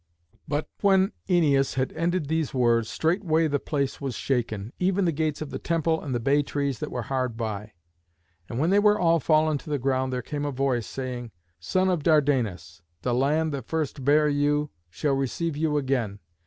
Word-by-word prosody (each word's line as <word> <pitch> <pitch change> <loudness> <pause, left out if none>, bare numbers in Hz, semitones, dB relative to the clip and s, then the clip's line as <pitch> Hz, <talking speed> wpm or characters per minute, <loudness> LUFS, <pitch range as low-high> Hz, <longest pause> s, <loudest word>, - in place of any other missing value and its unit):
But 145 +1 -1
when 195 0 +4 0.2
Æneas 145 -7 +3
had 130 0 -1
ended 170 0 0
these 160 -2 -1
words, 115 -2 +2
straightway 165 -1 +1
the 145 -1 0
place 140 -1 -2
was 135 -4 -3
shaken, 115 -4 -2
even 190 +1 +2
the 170 - +2
gates 155 0 -1
of 145 - -9
the - - -4
temple 165 -1 0
and 135 -5 -3
the - - 0
bay 140 +5 +3
trees 140 -2 -2
that - - -4
were 125 - -4
hard 125 -1 -2
by. 110 -2 -4 0.8
And 115 - -4
when 160 +7 +2
they 200 - +5
were 210 0 +4
all 170 -3 +3
fallen 155 0 +2
to - - -11
the 145 - 0
ground 130 0 0
there 125 -1 -2
came 145 +2 -4
a 145 - -1
voice, 130 -4 0
saying, 125 -2 -5 0.3
"Son 185 - +1
of 180 -4 +1
Dardanus, 120 - +1 0.2
the 125 - 0
land 150 +5 +1
that 135 -5 -5
first 155 -4 -2
bare 150 +3 +4
you 145 0 +1 0.2
shall 140 - -1
receive 135 +4 -1
you 150 0 0
again. 130 -8 -1
145 Hz, 195 wpm, -26 LUFS, 125-160 Hz, 0.8 s, they